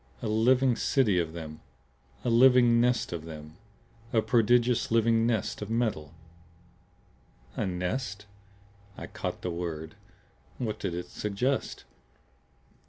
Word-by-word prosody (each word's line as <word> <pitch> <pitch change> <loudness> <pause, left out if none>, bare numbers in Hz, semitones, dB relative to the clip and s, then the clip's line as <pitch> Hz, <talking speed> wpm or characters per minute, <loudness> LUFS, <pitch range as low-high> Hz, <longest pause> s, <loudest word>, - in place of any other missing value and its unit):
"A - - -1
living 125 +4 +3
city 110 -7 +2
of 80 -2 -2
them! 80 -2 -8 0.6
A - - +1
living 120 -1 +6
nest 125 -6 +1
of 85 -2 -5
them; 75 0 -10 0.5
a 110 -2 +2
prodigious 120 +1 +2
living 115 0 +3
nest 110 -4 -1
of 105 - -5
metal!" 110 -10 -1 1.4
"A - - -1
nest?" 105 +4 -3 0.7
I - - -6
caught - - -6
the 90 - -2
word. 80 -2 -5 0.6
What 110 -4 -3
did 90 -4 -3
it 90 - -4
suggest? 115 +7 -2
110 Hz, 120 wpm, -28 LUFS, 85-120 Hz, 1.4 s, living